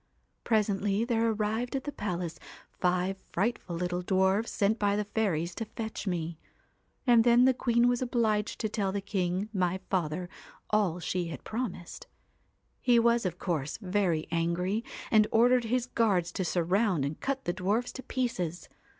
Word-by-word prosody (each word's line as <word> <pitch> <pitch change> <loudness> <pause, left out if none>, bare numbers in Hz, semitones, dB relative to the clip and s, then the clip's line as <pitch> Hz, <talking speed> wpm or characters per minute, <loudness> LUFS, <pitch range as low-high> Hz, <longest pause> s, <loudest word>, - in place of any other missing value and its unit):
' - - -46
Presently 210 -1 +1
there 230 -1 +1
arrived 220 +4 -1
at 265 - -2
the 290 - -4
palace 175 - -4 0.3
five 180 +1 0
frightful 195 -2 -1
little 180 +1 -2
dwarfs 190 +4 +2
sent 210 +2 +1
by 205 -1 +2
the 210 - 0
fairies 185 -6 -1
to 225 - -4
fetch 220 0 -6
me; 165 -3 -2 0.7
and 240 -3 +6
then 240 +1 +6
the 260 - +5
queen 240 -1 +2
was 245 0 +1
obliged 225 -4 0
to 220 - +1
tell 200 -2 -1
the 200 - -1
king, 190 -1 -1
my 185 -1 0
father, 175 -1 -1 0.4
all 200 -5 +2
she 180 +1 -2
had 155 -5 -7
promised. 220 -7 -5 0.7
He 245 -1 +4
was, 235 -2 +3
of 175 -1 -5
course, 155 -7 -2
very 180 -5 0
angry, 175 +6 0 0.3
and 215 -1 +5
ordered 245 +1 +4
his 245 +2 0
guards 200 -9 +1
to 185 - -2
surround 180 -1 +1
and 145 +2 -4
cut 270 0 -2
the 175 - 0
dwarfs 205 +6 0
to 260 - -7
pieces. 185 -11 -3
200 Hz, 165 wpm, -29 LUFS, 180-230 Hz, 0.7 s, and